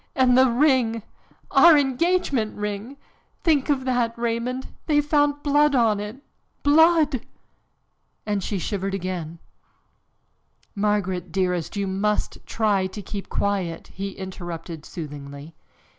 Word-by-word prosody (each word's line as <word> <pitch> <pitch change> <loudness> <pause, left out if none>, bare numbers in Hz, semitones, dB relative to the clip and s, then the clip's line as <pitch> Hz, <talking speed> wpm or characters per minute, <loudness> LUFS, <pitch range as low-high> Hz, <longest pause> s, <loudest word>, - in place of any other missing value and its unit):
And 255 -3 +4
the 260 0 +6
ring 240 -4 +2 0.5
our 310 +3 +7
engagement 275 -4 +1
ring 210 +6 -4 0.5
think 300 -4 +2
of 265 -3 +1
that, 245 -3 0
Raymond! 235 +2 -2 0.2
They 300 -2 +4
found 290 -1 +1
blood 290 0 +3
on 225 -4 +3
it, 210 +7 -7 0.4
blood!" 310 -3 +4 1.0
And 205 -2 -1
she 200 - -2
shivered 195 +1 -2
again. 175 -3 -4 1.4
"Margaret, 200 -4 -1
dearest, 180 -2 -1
you 200 - 0
must 200 +2 -1
try 205 -4 +1
to 205 +2 -8
keep 200 0 -6
quiet," 190 -5 -2
he 195 +1 -5
interrupted 175 -4 -7
soothingly. 145 -1 -8
215 Hz, 115 wpm, -24 LUFS, 190-270 Hz, 1.4 s, our